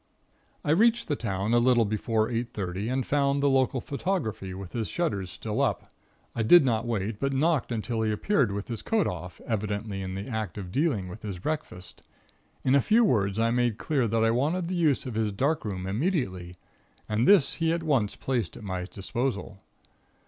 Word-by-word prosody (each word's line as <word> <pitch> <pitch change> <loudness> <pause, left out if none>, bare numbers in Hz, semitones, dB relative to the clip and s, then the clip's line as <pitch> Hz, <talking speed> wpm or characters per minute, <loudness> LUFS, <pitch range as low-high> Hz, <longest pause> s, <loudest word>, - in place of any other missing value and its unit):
I 150 - +2
reached 230 +7 +3
the 145 - +1
town 100 -2 -2
a 120 - +5
little 120 -1 +4
before 110 +1 0
eight 120 0 -3
thirty, 95 +2 -3
and 130 0 -1
found 140 -1 +1
the - - +4
local 130 -1 +2
photographer 120 - -3
with 95 -2 -8
his 115 -3 -2
shutters 100 - -2
still 110 +6 -3
up. 135 - -1 0.4
I 115 - 0
did 145 +7 +7
not 115 -2 0
wait, 105 -2 -2
but 140 0 0
knocked 150 -1 +1
until 115 0 -2
he 110 -1 +1
appeared 125 - +1
with 100 +1 -4
his 115 -3 -4
coat 220 -3 +1
off, 90 0 -5
evidently 105 -2 -2
in 95 0 -4
the 100 +2 -5
act 110 -7 -4
of 95 -3 -6
dealing 135 - 0
with 95 +5 -9
his 100 -4 -5
breakfast. 90 - -5 0.6
In 130 - +3
a 140 - +5
few 225 - +4
words 100 - +1
I 115 +1 +2
made 120 -2 +1
clear 135 -5 0
that 110 +1 +1
I 115 - +3
wanted 160 +9 0
the 185 - -2
use 155 -7 +2
of 125 - -5
his 110 -1 0
dark 140 +10 0
room 95 -3 -4
immediately, 95 - -2 0.5
and 110 +3 +1
this 185 -9 +6
he 165 0 +3
at 170 0 -1
once 135 -10 +1
placed 120 -8 -2
at - - -11
my 95 -2 -3
disposal. 105 +1 -4
115 Hz, 200 wpm, -27 LUFS, 100-140 Hz, 0.6 s, did